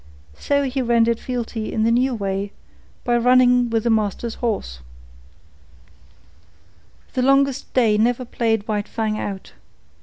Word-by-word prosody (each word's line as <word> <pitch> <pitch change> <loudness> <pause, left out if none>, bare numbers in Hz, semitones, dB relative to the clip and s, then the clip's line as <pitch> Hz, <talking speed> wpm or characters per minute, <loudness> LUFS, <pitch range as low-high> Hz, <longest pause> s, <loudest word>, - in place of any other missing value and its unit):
So 285 0 +1
he 265 0 -2
rendered 235 -1 +2
fealty 235 -3 -4
in 220 - 0
the 230 - +3
new 250 +2 +2
way, 200 -1 -3 0.5
by 240 -1 +2
running 250 0 +4
with 225 -1 0
the 235 - +1
master's 220 +1 -1
horse. 205 - -2 2.3
The 255 - 0
longest 275 +1 +2
day 220 -5 +3
never 245 +3 +1
played 225 -3 -1
White 210 -2 -2
Fang 215 -1 -2
out. 195 -2 -6
235 Hz, 130 wpm, -21 LUFS, 215-250 Hz, 2.3 s, running